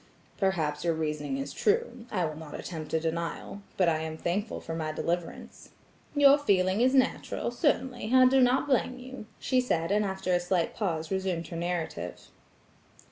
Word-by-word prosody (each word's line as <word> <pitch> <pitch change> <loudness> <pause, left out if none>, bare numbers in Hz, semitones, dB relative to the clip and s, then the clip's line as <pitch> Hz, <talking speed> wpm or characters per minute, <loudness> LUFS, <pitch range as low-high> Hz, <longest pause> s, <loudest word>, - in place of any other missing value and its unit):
"Perhaps 160 -7 0
your 170 -2 +1
reasoning 150 -3 -2
is 135 - -4
true; 420 - 0
I 185 -6 0
will 155 -1 -4
not 155 -1 -8
attempt 160 -4 -6
a - - +3
denial. 170 +4 -3 0.2
But 185 - +3
I 160 -2 +2
am 160 0 -4
thankful 200 +7 -2
for 165 - -6
my 160 -1 -2
deliverance." 170 +2 -4 0.5
"Your 285 0 +7
feeling 190 -5 +2
is 260 +2 +4
natural; 260 -2 +1
certainly, 250 -4 0
I 255 0 +7
do 265 +1 +5
not 250 +1 +3
blame 255 -2 +1
you," 255 -3 -9
she 255 -1 +1
said, 165 -8 0
and 210 +1 +3
after 190 -2 -1
a 175 - +4
slight 175 -1 0
pause 165 -6 -2
resumed 185 -4 -2
her - - -6
narrative. 165 - -3
185 Hz, 175 wpm, -29 LUFS, 160-245 Hz, 0.5 s, Your